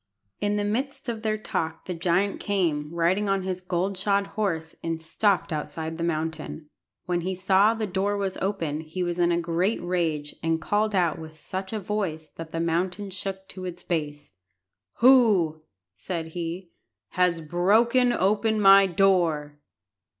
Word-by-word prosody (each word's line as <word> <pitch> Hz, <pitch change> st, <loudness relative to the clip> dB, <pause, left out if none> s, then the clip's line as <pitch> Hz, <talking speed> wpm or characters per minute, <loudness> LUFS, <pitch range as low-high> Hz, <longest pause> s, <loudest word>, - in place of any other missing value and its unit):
In 205 Hz, 0 st, 0 dB
the 205 Hz, -, 0 dB
midst 255 Hz, +6 st, -2 dB
of 225 Hz, -2 st, -4 dB
their 215 Hz, -1 st, 0 dB
talk 165 Hz, -6 st, -3 dB
the 185 Hz, -, -3 dB
giant 180 Hz, +4 st, 0 dB
came, 165 Hz, -8 st, 0 dB
riding 175 Hz, +5 st, +1 dB
on 195 Hz, -1 st, +1 dB
his 185 Hz, -1 st, -3 dB
gold 185 Hz, +2 st, -1 dB
shod 200 Hz, +1 st, +1 dB
horse, 165 Hz, -7 st, -2 dB
and 165 Hz, -1 st, -2 dB
stopped 180 Hz, +2 st, 0 dB
outside 160 Hz, +2 st, -4 dB
the -, -, -1 dB
mountain. 160 Hz, -1 st, -3 dB, 0.3 s
When 175 Hz, -1 st, 0 dB
he 185 Hz, +2 st, -2 dB
saw 195 Hz, +4 st, +4 dB
the 220 Hz, -1 st, -2 dB
door 200 Hz, +1 st, -1 dB
was 195 Hz, -2 st, -2 dB
open 170 Hz, -7 st, -2 dB
he 160 Hz, +3 st, -4 dB
was 175 Hz, 0 st, -2 dB
in 175 Hz, 0 st, +3 dB
a 170 Hz, -, +2 dB
great 175 Hz, +5 st, 0 dB
rage, 165 Hz, -4 st, -1 dB
and 165 Hz, 0 st, 0 dB
called 210 Hz, +4 st, 0 dB
out 175 Hz, -4 st, +1 dB
with 155 Hz, -1 st, -10 dB
such 190 Hz, +4 st, -6 dB
a 220 Hz, -, -2 dB
voice 185 Hz, -6 st, -3 dB
that 165 Hz, -1 st, -9 dB
the 165 Hz, -, -3 dB
mountain 180 Hz, +4 st, -1 dB
shook 190 Hz, 0 st, -5 dB
to 185 Hz, -1 st, -6 dB
its 180 Hz, -1 st, -6 dB
base. 150 Hz, -, -3 dB, 0.7 s
"Who," 215 Hz, -12 st, +5 dB, 0.3 s
said 160 Hz, -, -5 dB
he, 170 Hz, +1 st, -5 dB, 0.4 s
"has 180 Hz, -2 st, +2 dB
broken 220 Hz, +10 st, +3 dB
open 215 Hz, +1 st, +1 dB
my 195 Hz, -1 st, +7 dB
door?" 170 Hz, -6 st, +2 dB
180 Hz, 165 wpm, -26 LUFS, 165-200 Hz, 0.7 s, my